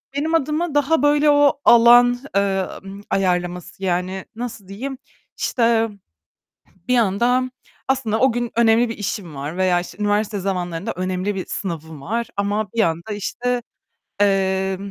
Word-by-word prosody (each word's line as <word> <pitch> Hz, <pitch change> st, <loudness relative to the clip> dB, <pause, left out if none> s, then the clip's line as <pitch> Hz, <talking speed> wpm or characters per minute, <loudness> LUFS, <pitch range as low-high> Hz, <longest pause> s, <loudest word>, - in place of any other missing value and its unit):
Benim 315 Hz, +3 st, 0 dB
adıma 310 Hz, +1 st, -1 dB
daha 290 Hz, +1 st, +2 dB
böyle 295 Hz, +1 st, +4 dB
o 290 Hz, -1 st, +4 dB
alan, 240 Hz, +1 st, +7 dB, 0.2 s
eee, 195 Hz, -1 st, +1 dB, 0.2 s
ımm, 195 Hz, +1 st, -9 dB
ayarlaması 180 Hz, -1 st, -1 dB
yani 185 Hz, +1 st, -1 dB
nasıl 230 Hz, -4 st, -6 dB
diyeyim, 260 Hz, +7 st, -6 dB, 0.4 s
işte 230 Hz, -2 st, +1 dB, 1.0 s
bir 250 Hz, -, +2 dB
yandan 245 Hz, +3 st, +2 dB, 0.4 s
aslında 250 Hz, -5 st, 0 dB
o 260 Hz, 0 st, +4 dB
gün 240 Hz, 0 st, -3 dB
önemli 230 Hz, +1 st, +4 dB
bir 225 Hz, -, -5 dB
işim 200 Hz, -6 st, -4 dB
var 145 Hz, +5 st, -5 dB
veya 185 Hz, -1 st, +2 dB
işte 175 Hz, -, -8 dB
üniversite 205 Hz, 0 st, 0 dB
zamanlarında 180 Hz, +1 st, -3 dB
önemli 185 Hz, +2 st, -2 dB
bir 190 Hz, -, -4 dB
sınavım 160 Hz, -5 st, -5 dB
var 230 Hz, +9 st, -2 dB
ama 205 Hz, 0 st, -1 dB
bir 230 Hz, -, -3 dB
yanda 170 Hz, 0 st, 0 dB
işte, 245 Hz, +4 st, -2 dB, 0.6 s
eee, 190 Hz, -1 st, +1 dB
205 Hz, 140 wpm, -21 LUFS, 185-245 Hz, 1.0 s, alan